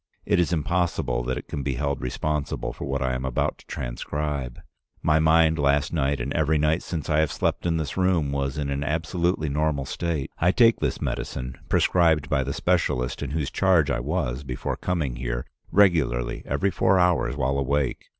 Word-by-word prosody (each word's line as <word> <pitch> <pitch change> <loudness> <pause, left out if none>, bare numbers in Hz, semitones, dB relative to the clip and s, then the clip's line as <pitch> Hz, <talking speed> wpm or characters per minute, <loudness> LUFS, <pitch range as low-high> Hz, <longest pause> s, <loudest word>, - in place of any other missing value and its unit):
It - - +2
is 85 -1 +2
impossible 80 -6 0
that 65 +1 -1
it - - -7
can 70 - -4
be 70 -1 -2
held 70 +1 -2
responsible 75 +3 -2
for - - -6
what 70 0 -1
I 65 -1 0
am 65 +1 -3
about 65 -2 -1
to - - -19
transcribe. 70 +1 -4 0.4
My 80 0 +4
mind 80 0 +4
last 70 +1 +2
night 70 -3 +1
and 65 +3 -3
every 80 -1 +2
night 75 +2 +2
since 80 -4 -5
I 75 0 +2
have 80 -2 +2
slept - - -1
in 80 -1 +1
this 80 0 -3
room 90 -6 +2
was 70 0 -2
in 70 -2 -2
an 70 0 -1
absolutely 80 +2 0
normal 75 -1 0
state. 80 -2 -3
I 90 +2 +3
take 115 -2 +5
this - - -2
medicine, 65 0 -4
prescribed 80 -4 +3
by 70 -3 +2
the 70 - -3
specialist 75 -7 0
in 70 - -3
whose 75 -2 -2
charge 90 -6 +3
I - - 0
was 70 -2 -2
before 65 -3 -3
coming 80 -9 -2
here, - - -3 0.3
regularly 70 -12 +2
every 85 +9 0
four 95 +1 +3
hours 90 -6 +2
while 70 0 0
awake. 70 0 -1
75 Hz, 190 wpm, -25 LUFS, 65-80 Hz, 0.4 s, take